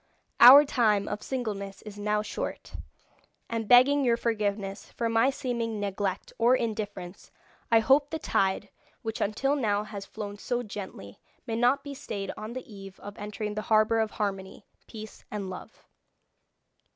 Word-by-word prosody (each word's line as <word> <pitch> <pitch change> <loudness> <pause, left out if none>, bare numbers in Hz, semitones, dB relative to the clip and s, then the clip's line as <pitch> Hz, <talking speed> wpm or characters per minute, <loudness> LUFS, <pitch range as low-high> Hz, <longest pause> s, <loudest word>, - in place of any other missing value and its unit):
Our 275 +5 +11
time 215 -7 +2
of 210 - -4
singleness 205 -7 -4
is 210 -1 -9
now 210 0 0
short, 210 - -5 0.7
and 230 -2 -3
begging 270 +4 +6
your 235 -2 +3
forgiveness 205 -4 -2
for 230 -1 -1
my 225 +3 +3
seeming 235 -5 -3
neglect 200 -1 -3
or 240 +2 +5
indifference, 205 -6 -4 0.4
I 225 -1 +6
hope 275 +5 +4
the 320 - -3
tide, 195 -9 0 0.3
which 225 -1 -4
until 270 +8 +1
now 210 -6 0
has 200 -2 -8
flown 205 -2 -7
so 245 +2 -2
gently, 190 - -8 0.3
may 225 -3 -3
not 245 +4 +2
be 285 -1 -6
stayed 200 -7 -5
on 215 +2 -7
the 255 - -6
eve 195 -3 -11
of 205 0 -9
entering 210 0 -4
the 215 - -3
harbour 220 +1 +4
of 220 -1 +1
harmony, 195 -2 -4 0.2
peace, 220 -1 -10
and 200 -3 -4
love." 185 - -11
215 Hz, 155 wpm, -28 LUFS, 205-240 Hz, 0.7 s, Our